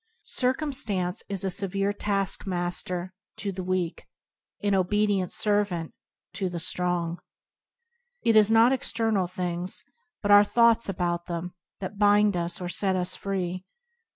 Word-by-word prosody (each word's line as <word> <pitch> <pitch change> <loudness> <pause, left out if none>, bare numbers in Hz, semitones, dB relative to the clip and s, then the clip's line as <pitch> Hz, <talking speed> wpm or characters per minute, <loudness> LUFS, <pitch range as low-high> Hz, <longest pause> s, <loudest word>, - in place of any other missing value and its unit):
Circumstance 250 -9 -1
is 195 -2 -1
a 190 - 0
severe 195 +2 -1
taskmaster 185 -3 -2 0.2
to 200 - -3
the 185 0 -5
weak, 180 -2 -2 0.6
an 205 -1 +2
obedient 195 0 +1
servant 205 -6 0 0.4
to 190 -2 -2
the 175 -1 -5
strong. 175 0 -1 1.0
It 230 - +3
is 215 -1 +6
not 225 +2 +6
external 225 -7 0
things, 180 0 -4 0.4
but 205 - +2
our 205 0 +9
thoughts 230 +1 +3
about 175 -2 -2
them, 175 +1 -4 0.3
that 200 +2 -6
bind 205 -1 +4
us 170 0 -1
or 180 - -4
set 190 +1 +2
us 180 -1 0
free. 185 -2 -3
190 Hz, 130 wpm, -26 LUFS, 180-205 Hz, 1.0 s, our